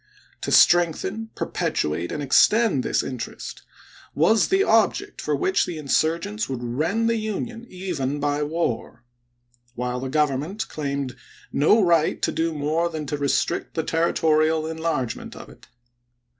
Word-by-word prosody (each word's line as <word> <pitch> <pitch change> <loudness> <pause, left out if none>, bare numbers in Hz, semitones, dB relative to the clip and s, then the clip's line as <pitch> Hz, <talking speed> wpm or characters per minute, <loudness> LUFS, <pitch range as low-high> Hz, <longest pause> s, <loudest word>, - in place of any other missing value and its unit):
To - - -3
strengthen, 175 +6 +3
perpetu 75 0 -1
ate, 85 +2 -4
and 150 - -3
extend 210 - +4
this - - 0
interest 125 -3 -6 0.5
was 210 +9 +4
the 385 +1 +3
object - - +1
for - - 0
which 380 0 +1
the 175 - -5
insurgents 150 -6 0
would 125 -2 -4
rend 160 - 0
the 230 0 +1
Union, 230 +2 -4
even 155 -7 -3
by 145 0 0
war; 145 -6 -2 0.7
while 125 +1 -2
the 130 +1 -4
Government 150 +9 -1
claimed 140 -3 -3 0.4
no 200 +10 +4
right 170 -3 +2
to - - +2
do 165 0 0
more 155 +3 0
than 155 -2 -5
to 145 +1 -3
restrict 140 -1 -1
the 160 - 0
territorial 160 -1 +2
enlargement 160 -7 -3
of - - -11
it. - - -17
155 Hz, 145 wpm, -23 LUFS, 140-175 Hz, 0.7 s, extend